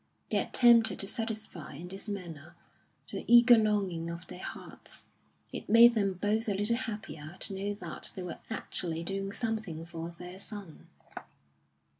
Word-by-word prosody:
They - - +2
attempted 235 -2 +5
to 195 - -5
satisfy 220 - -5
in 175 +5 -8
this 195 +3 -7
manner 170 -6 -7 0.6
the - - -4
eager 240 0 +9
longing 200 -7 +1
of 170 +1 -6
their 180 - -9
hearts; - - -8 0.5
it - - -6
made 235 +2 +8
them 200 -4 +1
both 215 +4 0
a 200 - +1
little 210 +4 +2
happier 210 -9 -6
to - - -2
know 200 +2 -2
that 205 - -4
they 185 - -5
were 180 - -6
actually 170 -6 -1
doing 195 +2 -2
something 220 -8 -3
for 165 0 -6
their 180 +2 -9
son. 200 -5 -4
195 Hz, 155 wpm, -31 LUFS, 170-220 Hz, 0.6 s, eager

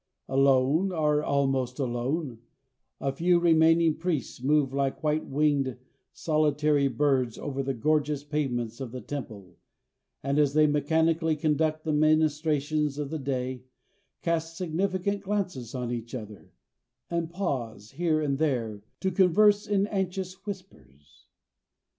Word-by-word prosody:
Alone, 135 +6 +3
or 150 -3 +1
almost 135 -3 0
alone, 130 0 -2 0.6
the 135 - -1
few 175 +5 +3
remaining 165 -1 +4
priests 165 -8 -3
move 140 0 +2
like 140 +2 -1
white 155 0 0
winged, 140 -3 +1 0.3
solitary 150 -2 +1
birds 130 -2 +1
over 135 -1 -3
the 135 0 -2
gorgeous 150 +2 0
pavements 130 -6 -2
of 125 -4 -5
the 130 - -6
temple, 110 -7 -8 0.6
and 140 +2 +1
as 145 -2 +3
they 155 0 +6
mechanically 160 +2 +2
conduct 155 +1 0
the 155 - -1
ministrations 155 -1 +1
of 145 -1 -4
the 160 - -3
day, 130 -2 -3 0.6
cast 165 -1 -1
significant 185 +3 -1
glances 185 - -3
on 125 -2 -3
each 120 +1 -5
other, 105 -4 -9 0.6
and 170 -1 -1
pause 120 - -4
here 155 +1 0
and 140 -2 -1
there 120 -9 -1 0.2
to 190 - 0
converse 205 +3 +4
in 200 -1 +2
anxious 190 -2 -3
whispers. 185 - -11
150 Hz, 130 wpm, -27 LUFS, 135-165 Hz, 0.6 s, they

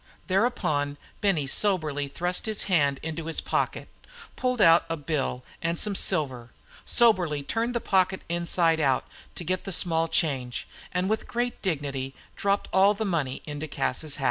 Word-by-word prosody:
Thereupon 155 -9 0 0.2
Benny 190 -8 +2
soberly 155 -3 +1
thrust 180 +8 -1
his 215 -1 +1
hand 145 -7 +2
into 160 0 -4
his 165 - +1
pocket, - - -1 0.5
pulled 250 -1 -1
out 165 -4 +7
a 165 - -2
bill 145 -4 -2 0.2
and 170 +1 -1
some 210 +3 +1
silver, 130 -10 0 0.4
soberly 180 -11 +3
turned 230 - -1
the - - +2
pocket 190 -1 +1
inside 170 -1 +2
out 135 -4 +2 0.3
to - - -4
get 185 +2 -1
the 195 - -5
small 165 -2 +3
change, 135 -7 -1 0.2
and 180 +1 0
with 220 +1 -1
great 240 +1 -2
dignity 140 -6 -3 0.2
dropped 200 0 0
all 195 +2 +5
the 220 +2 -2
money 155 -9 -2
into 150 +1 -5
Cas's 155 0 -1
hat. - - -9
165 Hz, 160 wpm, -26 LUFS, 145-195 Hz, 0.5 s, out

